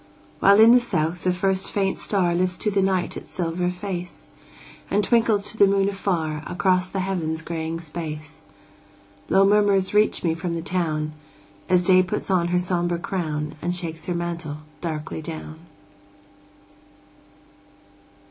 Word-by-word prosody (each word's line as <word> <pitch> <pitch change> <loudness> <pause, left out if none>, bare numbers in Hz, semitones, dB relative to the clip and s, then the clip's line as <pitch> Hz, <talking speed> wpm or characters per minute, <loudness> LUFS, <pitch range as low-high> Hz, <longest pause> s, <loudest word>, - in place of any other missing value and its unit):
While 200 +2 +6
in 225 +1 +8
the 250 - +7
south 170 -7 -2
the 180 - +3
first 190 +1 +1
faint 195 -2 0
star 185 -4 +1
Lifts 180 +1 0
to 210 - 0
the 195 0 +2
night 190 -2 0
its - - -9
silver 180 0 -2
face, 180 -1 -6 0.6
And 205 +1 +2
twinkles 225 -1 +2
to 220 - -12
the 200 - +6
moon 195 0 +2
afar 170 -6 -2
Across 185 0 +1
the 190 - -2
heaven's 165 -4 -2
graying 165 0 -4
space, 155 -5 -7 0.8
Low 195 +1 +5
murmurs 200 -2 +3
reach 210 +1 +2
me 165 -2 +2
from 170 +1 -3
the 165 - -4
town, 155 -4 -1 0.6
As 180 -1 +3
Day 185 0 +6
puts 190 +2 -3
on 175 -2 +2
her 180 +1 +1
sombre 175 -1 0
crown, 155 -4 -3
And 175 +2 -1
shakes 165 -2 -4
her 180 - -1
mantle 170 -3 -4 0.2
darkly 160 -1 -4
down. 155 0 -7
180 Hz, 150 wpm, -23 LUFS, 165-195 Hz, 0.8 s, in